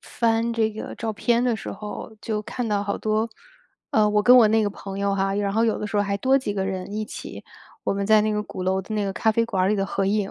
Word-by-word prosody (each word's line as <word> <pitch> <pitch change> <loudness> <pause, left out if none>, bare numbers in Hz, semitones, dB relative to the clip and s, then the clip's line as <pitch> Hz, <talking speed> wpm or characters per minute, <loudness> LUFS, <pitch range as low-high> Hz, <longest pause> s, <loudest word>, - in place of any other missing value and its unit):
翻 230 0 0
这 220 -1 +1
个 220 - -7
照 225 -1 -3
片 235 +3 +1
的 240 -2 +2
时 220 - -6
候， 210 +2 -7
就 215 -2 -2
看 245 +2 -4
到 205 -2 0
好 200 0 -2
多， 215 +1 0 0.6
呃， 210 -1 +4
我 210 0 +2
跟 250 +3 +7
我 225 -3 +7
那 220 0 +3
个 205 - 0
朋 195 -1 -8
友 200 0 +1
哈， 195 0 0
然 200 -1 0
后 225 +2 +2
有 225 - +1
的 210 - -3
时 210 - -9
候 205 - +3
还 200 0 -1
多 265 +6 +3
几 210 -6 -3
个 190 -1 -1
人 190 0 -4
一 215 0 -2
起， - - -9 0.4
我 - - +1
们 200 0 -2
在 215 -1 +5
那 215 0 0
个 210 0 -1
鼓 185 - -7
楼 190 +1 +1
的 215 +3 -6
那 210 -1 0
个 195 - -2
咖 220 +3 +2
啡 230 +1 +2
馆 195 -5 -1
儿 - - +2
里 210 - +2
的 195 - 0
合 195 0 -1
影。 205 -1 0
210 Hz, 310 characters per minute, -24 LUFS, 200-220 Hz, 0.6 s, 跟